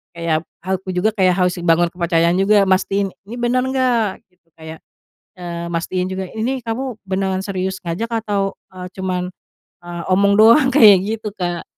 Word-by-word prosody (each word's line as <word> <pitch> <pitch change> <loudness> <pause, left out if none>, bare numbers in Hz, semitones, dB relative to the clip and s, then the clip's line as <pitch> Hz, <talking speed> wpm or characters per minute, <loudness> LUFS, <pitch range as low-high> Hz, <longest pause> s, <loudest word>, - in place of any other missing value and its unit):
kayak 165 -1 -1 0.2
aku 190 +1 -3
juga 185 +5 +2
kayak 185 -3 +3
harus 180 0 +1
bangun 170 0 +3
kepercayaan 170 -1 +1
juga, 200 +1 +4
mastiin 195 +1 +1 0.2
ini 235 - -7
benar 245 +1 +1
enggak 250 -6 0
gitu, 180 -2 -40
kayak, 160 0 -9 0.6
eee, 170 -1 -6
mastiin 180 +2 -2
juga 190 0 -3
ini 255 +4 -2
kamu 240 +1 -4
beneran 190 0 -1
serius 190 -1 -3
ngajak 180 +8 -3
atau, 200 -2 -1 0.2
eee, 180 0 -8
cuma, 185 -1 -3 0.6
eee, 175 0 -6
omong 200 +2 +3
doang, 230 +6 +6
kayak 215 -8 +8 0.2
gitu, 215 - -5
Kak. 175 -2 -3
190 Hz, 160 wpm, -19 LUFS, 175-215 Hz, 0.6 s, kayak